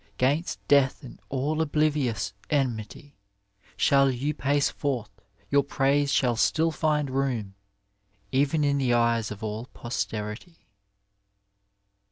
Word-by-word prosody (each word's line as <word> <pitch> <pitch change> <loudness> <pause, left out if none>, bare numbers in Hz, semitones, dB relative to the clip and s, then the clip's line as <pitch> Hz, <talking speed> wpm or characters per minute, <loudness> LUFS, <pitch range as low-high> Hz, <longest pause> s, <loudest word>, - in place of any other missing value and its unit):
'Gainst 145 +7 0
death 140 0 +3
and 130 - -11
all 140 +3 -1
obliyiouA 145 - 0 0.2
enmity 135 0 -2 0.6
Shall 140 -1 +4
you 135 +4 -1
pace 145 0 +1
forth; 125 -7 -3 0.4
your 140 - +5
praise 140 +1 +1
shall 125 -4 +2
still 160 +8 +2
find 150 -2 0
room 125 -7 -1 0.8
Even 145 +3 +2
in 140 -1 +2
the 125 -3 +2
eyed 115 -2 +2
of 105 +1 -8
all 110 +3 -4
poBterity. 120 - -5
135 Hz, 115 wpm, -26 LUFS, 120-145 Hz, 0.8 s, your